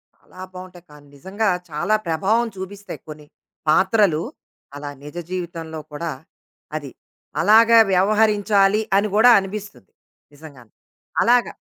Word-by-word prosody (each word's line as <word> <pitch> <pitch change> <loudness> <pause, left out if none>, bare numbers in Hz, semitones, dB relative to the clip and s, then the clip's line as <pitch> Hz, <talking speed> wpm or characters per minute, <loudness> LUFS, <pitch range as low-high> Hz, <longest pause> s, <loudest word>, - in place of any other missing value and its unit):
చాలా 185 - -16
బావుంటాయి. 180 -1 -11
కానీ 145 -1 -16
నిజంగా 200 +8 -2 0.2
చాలా 175 +8 0
ప్రభావం 200 +9 +1
చూపిస్తాయి 200 +2 -8
కొన్ని 150 0 -10 0.4
పాత్రలు, 190 -1 +3 0.5
అలా 145 0 -7
నిజ 150 +3 -11 0.2
జీవితంలో 165 -3 -5
కూడా, 160 +3 -4 0.6
అది, 145 -4 -6 0.5
అలాగా 225 +5 +6
వ్యవహరించాలి 210 +1 +3 0.2
అని 205 +2 +2
కూడా 225 +3 +6
అనిపిస్తది. 195 - -8 0.4
నిజంగానే. 140 -7 -15 0.5
అలాగా. 245 +1 +3
185 Hz, 110 wpm, -21 LUFS, 160-210 Hz, 0.6 s, అలాగా